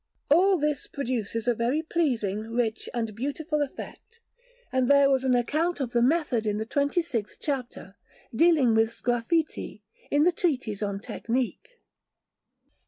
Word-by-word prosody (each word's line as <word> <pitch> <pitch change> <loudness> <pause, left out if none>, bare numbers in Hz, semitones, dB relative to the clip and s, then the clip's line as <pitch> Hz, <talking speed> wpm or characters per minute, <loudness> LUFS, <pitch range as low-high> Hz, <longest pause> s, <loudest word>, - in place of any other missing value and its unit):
All 375 +5 +5
this 300 -3 -1
produces 235 -4 -3
a 245 - +4
very 245 +7 0
pleasing, 245 - 0
rich, 225 0 -2
and 225 -3 -3
beautiful 295 - -2
effect; 440 - -7 0.5
and 260 -1 +1
there 280 -1 +6
was 265 -1 +2
an 255 -1 +3
account 310 +8 0
of 255 -4 -2
the 240 - +2
method 255 -5 +1
in 210 0 0
the 220 - -3
twenty 285 +8 0
sixth 235 -10 -4
chapter, 250 -8 -4 0.4
dealing 300 -5 +4
with 225 0 +3
sgraffiti, 240 0 -2 0.3
in 290 +1 +3
the 355 - +5
Treatise 265 - -1
on 200 -1 -2
Technique. 255 - -3
255 Hz, 145 wpm, -27 LUFS, 230-300 Hz, 0.5 s, there